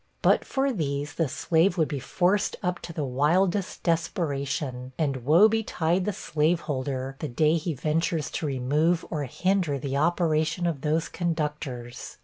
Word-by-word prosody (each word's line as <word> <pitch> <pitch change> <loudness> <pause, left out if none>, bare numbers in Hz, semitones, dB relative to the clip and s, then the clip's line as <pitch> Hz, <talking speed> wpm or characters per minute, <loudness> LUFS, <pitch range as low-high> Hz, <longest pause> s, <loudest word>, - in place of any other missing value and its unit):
But - - +4
for 270 0 0
these, 145 -6 -2
the 165 - 0
slave 165 +8 +2
would 160 -3 +3
be 145 -3 -3
forced 190 - +1
up 180 -1 -1
to - - -8
the 155 -3 -3
wildest 170 +9 +1
desperation; 140 -6 -1
and 145 -4 0
woe 155 - +6
betide 185 -5 0
the 210 - +1
slaveholder, 145 -6 -1
the 155 - -3
day 155 +5 +2
he 165 -1 -2
ventures 155 +2 -1
to 155 - -2
remove 145 +6 +1
or 150 -3 -2
hinder 180 +1 0
the 140 +1 -3
operation 160 +1 +1
of 160 -6 -1
those 155 +2 0
conductors! 150 -8 -4
155 Hz, 150 wpm, -26 LUFS, 140-175 Hz, -, woe